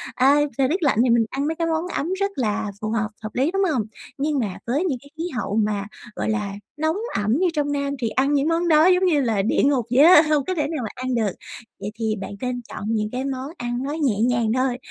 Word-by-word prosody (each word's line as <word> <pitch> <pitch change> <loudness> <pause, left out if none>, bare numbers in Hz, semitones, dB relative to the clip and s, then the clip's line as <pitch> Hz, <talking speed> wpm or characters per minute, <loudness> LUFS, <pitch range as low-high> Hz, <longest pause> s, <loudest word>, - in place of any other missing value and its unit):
À, 270 +3 +5 0.2
thời 270 -1 +3
tiết 350 +3 -1
lạnh 275 -7 +2
thì 255 - +2
mình 230 -1 +4
ăn 280 +2 -2
mấy 320 - -1
cái 330 0 -1
món 325 +2 -1
ấm 335 +6 -1
rất 395 0 0
là 215 -4 -1
phù 215 - -2
hợp, 215 -1 0 0.2
hợp 215 - -3
lý, 270 +6 +1
đúng 390 +1 +1
hông? 255 -7 +1 0.4
Nhưng 290 0 0
mà 200 -6 -2
với 285 +9 0
những 285 -8 0
cái 280 - -16
khí 325 - -3
hậu 210 -4 -2
mà, 210 -2 0 0.3
gọi - - -2
là, 210 -2 -1 0.2
nóng 315 +3 0 0.2
ẩm 215 +6 +1
như 370 - +3
trong 290 -2 0
Nam 280 -1 -1
thì 230 - 0
ăn 270 +5 +1
những 285 +1 +2
món 335 +1 +1
đó 310 -1 +5
giống 370 0 +4
như 310 -6 +3
là 225 -6 +1
địa 205 - +1
ngục 275 -4 +2
vậy 260 +3 +6
á, 330 -1 +9
hông 295 -3 +2
có 370 - -2
thể 300 -3 0
nào 315 -1 -3
mà 220 - -3
ăn 255 0 -2
được. 220 -5 +1 0.5
Vậy 200 +1 -5
thì 220 -1 0
bạn 195 - -6
nên 250 -1 -2
chọn - - -7
những 215 -1 0
cái 255 +2 -3
món 265 0 -4
ăn 240 -1 -3
nó 280 - -3
nhẹ 275 -10 0
nhàng 235 -2 +2
thôi, 255 0 0
265 Hz, 265 wpm, -23 LUFS, 225-305 Hz, 0.5 s, á